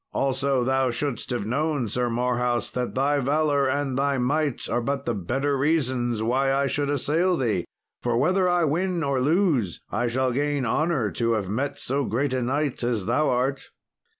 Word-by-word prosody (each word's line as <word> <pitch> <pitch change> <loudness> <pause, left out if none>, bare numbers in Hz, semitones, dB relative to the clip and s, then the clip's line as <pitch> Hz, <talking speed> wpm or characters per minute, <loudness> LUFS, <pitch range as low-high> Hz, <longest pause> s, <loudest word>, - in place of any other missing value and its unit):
Also, 135 -1 +1
thou 130 +1 +1
shouldst 125 +2 -2
have 120 -5 -2
known, 140 +1 0
Sir 120 +3 0
Marhaus, 120 -1 0
that 125 -1 -3
thy 140 +2 +2
valour 145 0 +2
and 135 -1 -1
thy 140 0 +1
might 140 +2 0
are 120 - 0
but 140 +4 -2
the 120 - 0
better 130 +9 -1
reasons 130 -6 0
why 130 +4 +1
I 140 +1 +2
should 140 +1 -1
assail 160 +6 +1
thee; 110 - 0 0.4
for 120 -1 0
whether 185 +7 +2
I 175 -1 +2
win 170 +3 0
or 140 -2 0
lose 145 - +1
I 120 +4 0
shall 130 +2 0
gain 145 +1 0
honour 130 - 0
to 115 -1 0
have 100 -4 -2
met 140 +7 -2
so 140 +2 -1
great 130 +4 -1
a 130 - 0
knight 140 +3 -1
as 120 -5 0
thou 155 - +2
art." 130 +2 -1
135 Hz, 180 wpm, -25 LUFS, 120-145 Hz, 0.4 s, thy